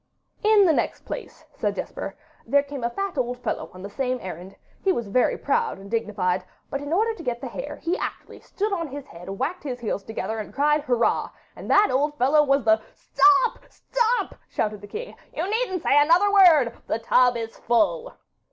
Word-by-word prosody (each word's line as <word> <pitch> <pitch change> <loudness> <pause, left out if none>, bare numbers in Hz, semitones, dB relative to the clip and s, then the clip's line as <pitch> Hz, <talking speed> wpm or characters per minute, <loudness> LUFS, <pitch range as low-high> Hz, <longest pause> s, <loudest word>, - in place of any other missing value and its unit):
'In 425 -2 +6
the 330 - +4
next - - -1
place,' - - -7
said - - -2
Jesper, - - -5 0.3
'there 280 +4 +4
came 285 -3 -7
a 235 - +1
fat 390 +4 -3
old 245 0 -1
fellow 250 - -4
on 185 0 -11
the 200 - -6
same 255 +3 -1
errand. 185 0 -8 0.3
He 390 - +3
was 235 -10 -1
very 225 +5 +1
proud 465 -1 0
and 195 +1 -12
dignified, 195 -5 0 0.3
but 275 - -2
in 285 +1 -6
order 440 +6 +2
to 435 - -10
get 245 -6 -3
the - - -6
hare - - -6
he 345 +3 -2
actually - - -6
stood 415 +1 -3
on 335 -4 -2
his 285 0 -8
head, 170 +2 -11
whacked 310 - -3
his 255 -4 -4
heels 210 -3 -2
together, 220 +1 -4
and 215 - -7
cried 295 +1 +3
"Hurrah"; 245 -5 +1 0.3
and - - -9
that 415 +1 +5
old 295 +3 0
fellow 280 +5 +4
was 275 -2 +2
the 220 0 +4
' - - -29
'Stop, 390 +5 +3
stop,' 485 0 -1
shouted 210 -2 -2
the 205 - -10
king; 465 - -7 0.2
'you 335 - -1
needn't 410 -5 -1
say 290 - +5
another 350 +7 +4
word; 320 -12 +6
the - - 0
tub 245 +2 +3
is 225 -1 -6
full. 470 - +1
280 Hz, 205 wpm, -24 LUFS, 230-375 Hz, 0.3 s, In